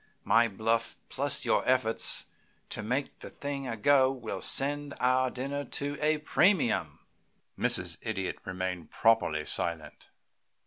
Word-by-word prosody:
My 115 +1 +4
bluff 115 +2 0
plus - - -1
your - - +3
efforts 125 -3 +2 0.5
to - - -4
make 125 +6 -2
the - - -9
thing 140 -1 -5
a 115 -2 -3
go 130 +3 +4
will 115 -7 -5
send 145 +5 +1
our 130 +1 +3
dinner 140 +3 -4
to 140 +2 -3
a 155 +1 +3
premium." 150 - +1 0.5
Mrs. - - -1
Idiot 95 -4 -3
remained 90 -3 -4
properly 105 -10 +2
silent. 80 -3 -4
120 Hz, 130 wpm, -30 LUFS, 100-140 Hz, 0.5 s, My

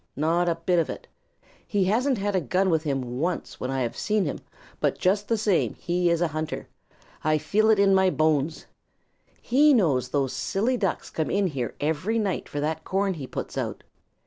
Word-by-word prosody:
Not 170 +4 +1
a 170 - +1
bit 170 +1 +1
of 165 - 0
it. - - -7 0.6
He 205 -2 +1
hasn't 240 +7 +2
had 205 0 -1
a 185 - +2
gun 185 +7 +1
with 160 -1 +2
him 130 -5 -3
once 175 +3 -2
when 125 - -3
I 135 0 -1
have 120 -2 -2
seen 210 -2 0
him, 145 - -3 0.4
but - - 0
just 200 +3 +1
the 230 - +1
same 205 -4 +1
he 175 0 0
is 170 0 +1
a 175 - +2
hunter. 155 +1 -4 0.6
I 155 0 +3
feel 215 +8 +2
it 220 - +5
in 200 -1 +4
my 190 -1 +4
bones. 155 -2 0 0.8
He 285 +4 +5
knows 140 - +2
those 135 -1 0
silly 225 +7 0
Ducks 200 -7 -2
come 160 - -2
in 200 0 +1
here 135 -9 -3
every 160 +9 0
night 205 -5 -1
for 145 - -4
that 160 +1 -2
corn 195 +2 0
he 145 -6 -7
puts - - -5
out. - - -4
175 Hz, 200 wpm, -25 LUFS, 155-200 Hz, 0.8 s, it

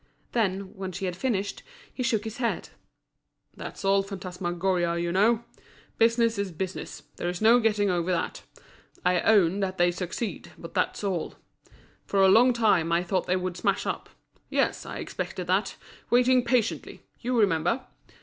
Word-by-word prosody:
Then, 195 -4 -1
when 190 -1 -5
she 190 +2 -4
had 180 -1 -2
finished, 200 -1 -2 0.3
he - - -5
shook 235 -4 +1
his 220 +1 -6
head. 235 -2 -2 0.9
"That's - - -7
all 195 0 +4
phantasmagoria, 180 -2 -2
you 170 0 -1
know. 220 +5 +3 0.6
Business 230 -1 +3
is 200 -2 -2
business, 185 +3 -5
there's 175 0 -3
no 230 +3 +6
getting 210 -3 +2
over 175 0 0
that. 170 -2 -2 0.6
I 180 -1 +3
own 200 -3 +4
that 190 -1 -2
they 175 0 +4
succeed, 185 +5 -5
but - - -10
that's - - -1
all. 185 -5 -2 0.7
For 200 - 0
a 190 - +7
long 240 +6 +6
time 205 -8 +2
I 170 +1 +2
thought 185 +1 -1
they 180 - +2
would 185 -1 -2
smash - - 0
up; - - -3 0.4
yes, - - 0
I - - -6
expected - - -5
that, - - 0 0.3
waiting 250 +1 +4
patiently—you 245 0 -1
remember? 210 +6 +2
195 Hz, 155 wpm, -27 LUFS, 180-225 Hz, 0.9 s, a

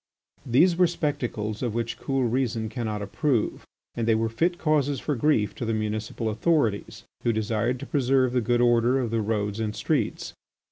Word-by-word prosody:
These 170 +9 +4
were 180 -1 +5
spectacles 125 -10 -3
of 120 -4 -2
which 115 -1 -3
cool 135 -1 0
reason 120 -2 0
cannot 110 -3 -3
approve 115 +4 -1 0.3
and 115 -1 -2
they 115 - +4
were 115 0 0
fit 170 +10 0
causes 145 -4 +1
for 150 - -2
grief 115 -5 +2
to - - -6
the 115 -1 0
municipal 110 +1 -3
authorities, 115 -2 0 0.2
who 120 - +2
desired 110 +3 -1
to - - -5
preserve 130 -3 +2
the 125 - +2
good 120 +2 +1
order 120 +1 +4
of 120 -4 -1
the 115 -1 +1
roads 105 -1 -1
and 110 -1 -2
streets. - - -1
120 Hz, 180 wpm, -26 LUFS, 110-135 Hz, 0.3 s, were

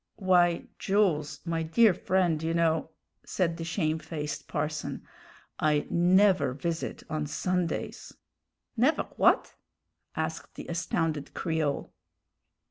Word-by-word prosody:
"Why, 175 -3 +3
Jools, 175 -7 +1
my 165 -1 -1
dear 195 +6 +4
friend, 175 -4 +1
you 165 +1 -1
know," 160 -1 +1 0.3
said 170 -3 -1
the 165 - -5
shamefaced 160 -3 -3
parson, 150 +1 -3 0.5
"I 150 -1 +2
never 185 -3 +4
visit 165 +5 -4
on 155 -1 -2
Sundays." 180 +3 -2 0.6
"Never 255 +7 +3
w'at?" - - +2 0.6
asked - - -4
the - - -7
astounded 165 -3 -2
Creole. 160 -4 -1
165 Hz, 105 wpm, -28 LUFS, 155-180 Hz, 0.6 s, dear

